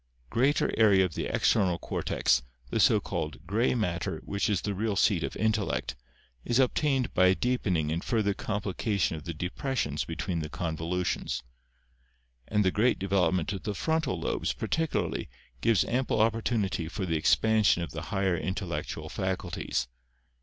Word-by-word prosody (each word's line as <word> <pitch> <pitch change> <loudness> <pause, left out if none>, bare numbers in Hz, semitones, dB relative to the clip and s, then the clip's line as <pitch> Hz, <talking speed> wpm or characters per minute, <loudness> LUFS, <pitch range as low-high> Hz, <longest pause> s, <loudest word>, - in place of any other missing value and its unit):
Greater 135 +5 +2
area 100 -4 +6
of 90 - -4
the - - -3
external 95 -5 +2
cortex, 60 - +1 0.3
the - - 0
so - - +5
called 75 0 -4
"gray 115 +5 +1
matter" 95 -7 -1
which 100 +3 -1
is 100 -4 +1
the 100 - -2
real 105 +1 -1
seat 95 -3 +3
of - - -3
intellect, 110 -1 0 0.5
is 120 - +1
obtained 135 0 +2
by 90 0 +5
a 95 - +4
deepen 120 -7 0
ing 75 -1 -1
and 85 +2 -2
further 105 -4 +1
complication 100 -2 -1
of 75 - -9
the 85 - -4
depressions 90 - -2
between 85 +1 -3
the 75 -1 -4
convolutions. 85 -4 -2 1.0
And 105 -1 +1
the 95 - +4
great 115 +6 +2
development 95 -3 +1
t>f 95 -1 -3
the 105 -1 -3
frontal 160 - 0
lobes, - - -1
par - - -5
ticularly, 160 -1 -1 0.3
gives 115 -3 +3
ample 125 -2 0
opportunity 110 -6 +1
for 95 +3 -4
the 85 -2 -1
expansion 105 +3 +3
of 85 - -6
the 75 - -5
higher 95 -3 +1
intellectual 95 +1 -4
faculties. 60 -1 -2
100 Hz, 160 wpm, -29 LUFS, 85-110 Hz, 1.0 s, area